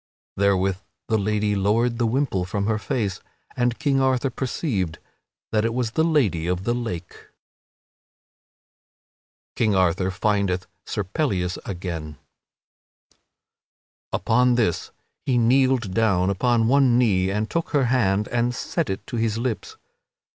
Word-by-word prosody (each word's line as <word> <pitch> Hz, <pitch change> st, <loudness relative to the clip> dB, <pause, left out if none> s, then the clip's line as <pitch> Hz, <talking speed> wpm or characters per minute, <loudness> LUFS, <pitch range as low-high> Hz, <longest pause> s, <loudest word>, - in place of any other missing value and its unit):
Therewith 95 Hz, -1 st, +2 dB, 0.3 s
the 110 Hz, -, +3 dB
lady 105 Hz, 0 st, 0 dB
lowered 115 Hz, +5 st, +1 dB
the 120 Hz, -, +2 dB
wimple 120 Hz, -6 st, 0 dB
from 100 Hz, +2 st, -2 dB
her 110 Hz, 0 st, 0 dB
face 105 Hz, -5 st, -2 dB, 0.4 s
and 120 Hz, -1 st, 0 dB
King 140 Hz, -4 st, +1 dB
Arthur 130 Hz, 0 st, +1 dB
perceived 115 Hz, -, -2 dB, 0.5 s
that 110 Hz, -1 st, +2 dB
it 115 Hz, +1 st, -1 dB
was 125 Hz, -3 st, -1 dB
the 160 Hz, -, +1 dB
Lady 115 Hz, -, +1 dB
of 90 Hz, +1 st, -1 dB
the 120 Hz, -, 0 dB
Lake. 110 Hz, -9 st, -4 dB
[Sidenote: -, -, -18 dB, 2.3 s
King 110 Hz, -3 st, +2 dB
Arthur 95 Hz, 0 st, +2 dB
findeth 100 Hz, -2 st, 0 dB, 0.2 s
Sir 105 Hz, -, -2 dB
Pellias 95 Hz, -, -1 dB
again] 85 Hz, -5 st, -5 dB, 1.9 s
Upon 125 Hz, +2 st, +2 dB
this 110 Hz, -9 st, 0 dB, 0.4 s
he 130 Hz, -2 st, +2 dB
kneeled 125 Hz, -3 st, +3 dB
down 100 Hz, -4 st, +2 dB
upon 115 Hz, +3 st, +2 dB
one 130 Hz, -2 st, +4 dB
knee 95 Hz, -7 st, +2 dB
and 105 Hz, +2 st, -1 dB
took 170 Hz, +5 st, -2 dB
her 140 Hz, -4 st, +2 dB
hand 105 Hz, -5 st, +2 dB
and 120 Hz, +1 st, 0 dB
set 165 Hz, +3 st, -2 dB
it 95 Hz, -, -4 dB
to 130 Hz, -4 st, -5 dB
his 115 Hz, -1 st, 0 dB
lips. 115 Hz, -2 st, -3 dB
110 Hz, 135 wpm, -23 LUFS, 95-125 Hz, 2.3 s, one